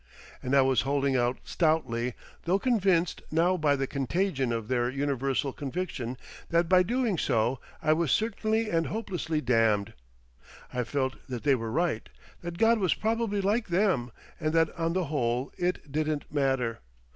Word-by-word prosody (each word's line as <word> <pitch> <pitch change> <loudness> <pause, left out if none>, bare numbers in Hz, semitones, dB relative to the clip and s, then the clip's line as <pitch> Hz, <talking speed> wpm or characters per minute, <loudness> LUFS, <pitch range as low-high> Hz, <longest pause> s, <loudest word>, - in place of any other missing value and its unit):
And 130 +2 0
I 135 - +6
was 130 -1 +3
holding 140 -1 +1
out 120 0 +1
stoutly, 125 -8 0 0.3
though 180 +3 +3
convinced 195 -7 +1
now 170 +4 +2
by 150 -4 +2
the 135 0 -1
contagion 140 0 -1
of 115 -2 -3
their 120 -1 +1
universal 135 0 -1
conviction 135 -5 -4 0.3
that 170 0 +2
by 185 +1 +6
doing 230 -2 0
so 120 0 +1 0.2
I 155 0 +4
was 165 -1 0
certainly 220 0 +1
and 165 -1 +1
hopelessly 180 -8 -2
damned. 115 -5 +2 0.8
I 125 -1 -1
felt 130 0 -1
that 125 -3 -4
they 145 - +4
were 115 -3 -2
right, 160 -7 -1 0.3
that 175 0 -6
God 225 +3 +4
was 185 -4 +2
probably 220 -2 0
like 215 +4 +1
them, 175 - +1 0.3
and 155 -1 -1
that 165 -1 +2
on 165 0 -1
the 185 0 +1
whole 125 -3 -1
it 175 -5 -2
didn't 155 0 -2
matter. 135 -5 0
150 Hz, 160 wpm, -28 LUFS, 130-180 Hz, 0.8 s, I